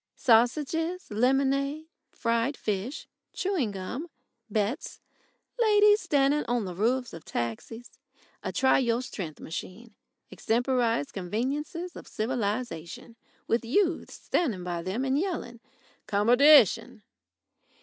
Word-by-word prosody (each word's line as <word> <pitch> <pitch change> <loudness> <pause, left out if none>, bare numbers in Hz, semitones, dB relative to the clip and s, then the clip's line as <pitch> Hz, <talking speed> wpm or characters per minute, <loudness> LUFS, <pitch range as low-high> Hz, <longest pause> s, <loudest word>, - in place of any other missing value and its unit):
Sausages, 305 - +1
lemonade, 275 +6 +1 0.2
fried 235 +4 -1
fish, 215 +7 -3 0.3
chewing 370 - -1
gum, 205 - -6 0.4
bets, 215 +7 -2 0.6
ladies 420 -2 +5
standing 285 +1 +2
on 240 -2 -1
the 180 - -5
roofs 240 +7 0
of 165 - -9
taxis, 225 - -5 0.4
a - - -4
try 265 0 +3
your 240 -1 0
strength 170 -10 -6
machine, 205 +7 -8 0.4
extemporised 235 - 0
conveniences 275 - -3
of - - -10
civilisation, 220 -4 -3 0.3
with 235 +1 0
youths 335 - 0
standing 230 - -1
by 175 -1 -3
them 195 +9 -2
and 270 +2 +1
yelling 320 -10 -3 0.5
"Commodytion!" 245 +9 +5
245 Hz, 105 wpm, -28 LUFS, 210-285 Hz, 0.6 s, ladies